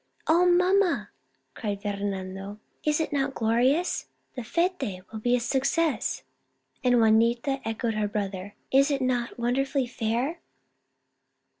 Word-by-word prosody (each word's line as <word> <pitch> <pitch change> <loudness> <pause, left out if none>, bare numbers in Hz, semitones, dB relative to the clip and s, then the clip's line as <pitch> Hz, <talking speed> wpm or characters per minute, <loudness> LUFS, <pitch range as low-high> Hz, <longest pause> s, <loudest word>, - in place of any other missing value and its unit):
"Oh, 345 +3 +4
mamma!" 365 +1 +3 0.4
cried 205 -3 -4
Fernando. 200 -1 -4 0.3
"Is 300 0 +2
it 320 - -2
not 270 -1 0
glorious? 250 +10 +1 0.3
The 250 - -5
fete 270 - -1
will 220 - -5
be 245 +3 +2
a - - +1
success! 275 +6 0 0.3
" - - -43
and 245 -1 +4
Juanita 235 +4 +3
echoed 225 +1 -2
her 215 -1 0
brother, 200 -1 -4
" - - -44
Is 275 +2 +5
it 275 -2 0
not 245 -1 -1
wonderfully 265 +3 0
fair 240 +7 -2
245 Hz, 135 wpm, -27 LUFS, 215-280 Hz, 0.4 s, Is